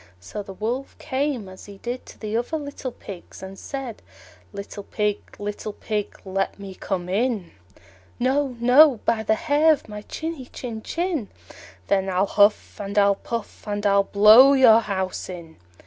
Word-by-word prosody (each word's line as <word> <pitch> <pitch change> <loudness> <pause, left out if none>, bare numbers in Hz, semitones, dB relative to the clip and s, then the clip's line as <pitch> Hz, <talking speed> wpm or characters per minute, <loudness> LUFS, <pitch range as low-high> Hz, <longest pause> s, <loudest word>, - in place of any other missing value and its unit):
So 90 - -7
the 195 - -9
Wolf 240 +7 -3
came, 270 -6 -2
as 185 0 -12
he 200 -1 -11
did 245 +5 -6
to - - -13
the 215 0 -4
other 245 +7 -1
little 285 -3 -6
Pigs, 190 -4 -11
and 190 0 -9
said, 270 -5 -6 0.5
"Little 200 +1 -7
Pig, 210 0 -1 0.2
little 205 +1 -5
Pig, 210 -1 -4
let 195 0 -2
me 200 -1 -8
come 185 -1 -4
in." 210 -1 -1 0.7
"No, 260 0 0
no, 250 +1 +6
by 230 -1 +2
the 220 0 +2
hair 295 +7 +3
of 305 - -1
my 210 -1 -7
chinny 315 +2 -6
chin 230 -4 -7
chin." 330 - -2 0.6
"Then 195 -1 +1
I'll 185 +1 +2
huff 205 +1 +2
and 200 0 -5
I'll 200 0 +5
puff, 230 +2 -6
and 205 0 -3
I'll 200 0 +4
blow 215 +8 +8
your 245 -5 +7
house 190 -5 -3
in." 170 -3 -9
215 Hz, 165 wpm, -23 LUFS, 200-255 Hz, 0.7 s, blow